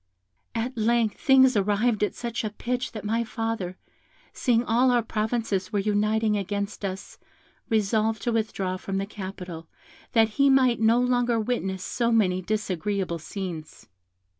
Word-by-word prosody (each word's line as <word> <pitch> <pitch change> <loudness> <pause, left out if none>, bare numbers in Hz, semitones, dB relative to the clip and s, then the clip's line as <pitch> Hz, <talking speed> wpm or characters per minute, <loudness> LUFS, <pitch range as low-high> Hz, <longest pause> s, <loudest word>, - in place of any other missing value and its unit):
At 240 +3 -2
length 230 -1 +1
things 260 -2 +5
arrived 210 +3 +1
at 210 - -1
such 235 -1 -4
a 215 - -1
pitch 245 +4 -3
that 215 -2 -7
my 225 +2 +1
father, 225 -5 -3 0.6
seeing 240 -2 +2
all 240 +3 +3
our 245 -2 +3
provinces 215 -4 -1
were 210 - 0
uniting 210 +1 +1
against 200 +1 -3
us, 190 -1 -5 0.5
resolved 220 0 +1
to 240 - 0
withdraw 205 -5 -1
from 195 +1 -4
the 195 - -1
capital, 185 -5 -8 0.5
that 225 -1 +5
he 275 +6 +3
might 255 -4 +4
no 225 +2 +4
longer 245 -2 +2
witness 195 -5 -2
so 235 +2 0
many 185 -5 +2
disagreeable 190 -3 -2
scenes. 165 - -7
215 Hz, 145 wpm, -26 LUFS, 195-235 Hz, 0.6 s, things